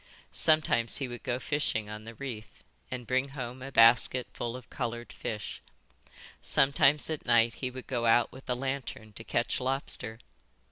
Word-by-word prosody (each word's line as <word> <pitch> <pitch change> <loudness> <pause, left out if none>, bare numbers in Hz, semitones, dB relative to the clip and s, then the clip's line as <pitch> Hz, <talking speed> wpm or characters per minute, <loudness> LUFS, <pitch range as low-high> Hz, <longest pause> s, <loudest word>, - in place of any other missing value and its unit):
Sometimes 155 -7 +3
he 135 - -2
would 120 -1 -7
go 125 -2 -1
fishing 130 -6 -1
on 105 +1 -8
the 115 0 -9
reef, 115 -6 -8 0.3
and 125 -1 -5
bring 130 +3 +1
home 125 0 -5
a 135 +1 -7
basket 120 +2 +6
full 120 0 -4
of 125 -2 -9
coloured 120 -2 -4
fish. 105 -2 -5 0.8
Sometimes 140 +1 +4
at 155 - -3
night 120 -1 +4
he 130 - -1
would 130 0 -8
go 120 -2 -1
out 120 +1 +4
with 130 0 -13
a 125 - +2
lantern 130 -4 -4
to - - -7
catch - - 0
lobster. 130 -4 -2
125 Hz, 170 wpm, -30 LUFS, 115-135 Hz, 0.8 s, basket